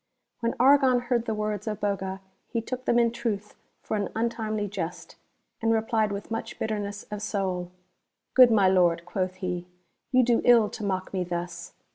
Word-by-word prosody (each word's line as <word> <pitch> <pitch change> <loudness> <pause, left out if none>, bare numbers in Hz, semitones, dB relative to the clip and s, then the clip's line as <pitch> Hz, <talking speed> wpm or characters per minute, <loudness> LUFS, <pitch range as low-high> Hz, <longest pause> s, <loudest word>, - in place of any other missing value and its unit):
When 230 -1 -1
Argon 265 -1 +5
heard 240 -1 0
the 220 - 0
words 210 0 -3
of 210 -2 -2
Boga 190 -1 -2 0.3
he 235 - -2
took 255 +3 -5
them 235 - +3
in 235 -1 +4
truth 225 -4 -3 0.3
for - - -2
an 205 -2 -1
untimely 220 -2 -1
jest, 180 -4 -6 0.5
and 225 0 +2
replied 220 -1 +1
with 200 +2 -6
much 225 - -4
bitter 215 -1 -2
ness 205 0 -5
of 210 -1 -4
soul: 190 -4 -2 0.3
" - - -55
Good 255 -2 +8
my 205 -4 +4
Lord," 175 -2 +3
quoth 185 +1 -2
he, 180 -2 -4 0.2
" - - -50
you 255 -1 +5
do 235 -1 +3
ill 235 -4 +6
to 225 - -7
mock 190 -2 -2
me 185 -2 0
thus 175 -1 -5
210 Hz, 190 wpm, -27 LUFS, 190-230 Hz, 0.5 s, Good